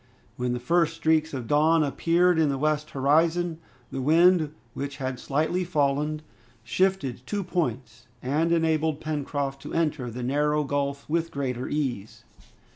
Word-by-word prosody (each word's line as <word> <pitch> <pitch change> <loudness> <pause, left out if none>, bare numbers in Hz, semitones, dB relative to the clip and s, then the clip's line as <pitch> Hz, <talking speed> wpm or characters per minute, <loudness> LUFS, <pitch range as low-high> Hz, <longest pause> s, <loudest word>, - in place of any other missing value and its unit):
When 125 0 -1
the 125 - -2
first 165 +5 +1
streaks 160 -1 +2
of 130 -4 -5
dawn 155 +4 +3
appeared 165 +5 +2
in 155 -2 +3
the 135 - -1
western 150 0 -1
horizon, 165 +3 +2 0.3
the 135 - -3
wind, 165 +2 +4 0.2
which 140 0 -5
had 130 -2 -4
slightly 160 +6 0
fallen, 150 -2 0 0.4
shifted 135 - 0
two 205 -1 -2
points, 130 -11 -3
and 150 +7 0
enabled 160 -2 +1
Pencroft 145 -3 -3
to - - -7
enter 150 -6 0
the 120 +2 -6
narrow 150 +3 +1
gulf 140 0 -2
with 165 +1 0
greater 130 -4 -3
ease. 130 -9 -3
150 Hz, 145 wpm, -26 LUFS, 135-165 Hz, 0.4 s, wind